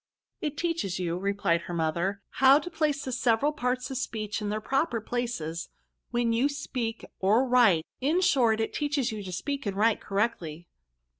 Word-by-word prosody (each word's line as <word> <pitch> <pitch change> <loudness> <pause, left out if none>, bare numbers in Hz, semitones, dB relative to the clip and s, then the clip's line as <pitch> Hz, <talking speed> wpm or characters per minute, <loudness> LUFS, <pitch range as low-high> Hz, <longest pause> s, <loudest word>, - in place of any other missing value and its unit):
" - - -56
It 300 -2 -3
teaches 330 - -1
you, 175 -2 -1
replied 195 -2 0
her 170 +1 -6
mother, 170 +5 -1
^* - - -55
how 270 +1 +8
to 330 +4 -4
place 305 -3 0
the 260 - -3
several 250 +3 +2
parts 250 -3 -2
of 260 - -2
speech 215 -4 -3
in 210 - -2
their 215 +1 -1
proper 265 +1 0
places, 215 -9 -3 0.4
when 240 -1 +1
you 250 +5 +2
speak 250 -5 -4
or 220 +7 +3
write; 225 -10 +5
in 300 +7 +2
short, 235 -10 +3
it 225 - -1
teaches 290 -5 0
you 215 -1 -5
to 190 -2 -7
speak 275 +7 -3
and 195 -1 -2
write 220 +1 +3
correctly." 180 -6 -2
230 Hz, 190 wpm, -28 LUFS, 195-270 Hz, 0.4 s, how